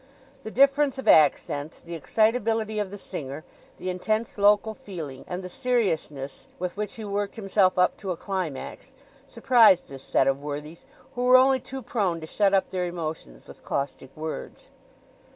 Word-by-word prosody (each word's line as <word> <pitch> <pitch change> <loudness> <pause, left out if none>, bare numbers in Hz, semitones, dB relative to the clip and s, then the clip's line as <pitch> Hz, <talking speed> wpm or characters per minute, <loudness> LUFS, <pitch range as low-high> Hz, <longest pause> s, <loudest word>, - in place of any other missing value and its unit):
The 220 - -7
difference 275 +3 +3
of 265 - -6
accent, 145 0 +3
the 170 - -7
excitability 220 - +1
of 205 -2 -2
the 205 - -8
singer, 145 -5 -7 0.3
the 185 - -3
intense 215 +4 -2
local 205 +2 +4
feeling, 160 -11 -8
and 180 +1 -5
the - - -5
seriousness 175 - -2
with 180 0 -4
which 210 0 -4
he 220 - -7
worked 200 0 -2
himself 195 -3 +2
up 180 0 +3
to 195 - -6
a 180 - -2
climax, 185 -9 -5 0.3
surprised 225 -8 +4
this 135 -1 -9
set 135 - +2
of 135 +1 +1
worthies, 150 +3 -7 0.3
who 245 0 -2
were 255 0 +8
only 265 0 +4
too 265 +1 -7
prone 195 -8 -1
to 160 - -7
shut 200 +4 +2
up 195 -1 +1
their 180 -1 -1
emotions 155 - -6
with - - -14
caustic 140 -1 -3
words. 155 0 -7
190 Hz, 170 wpm, -26 LUFS, 155-220 Hz, 0.3 s, were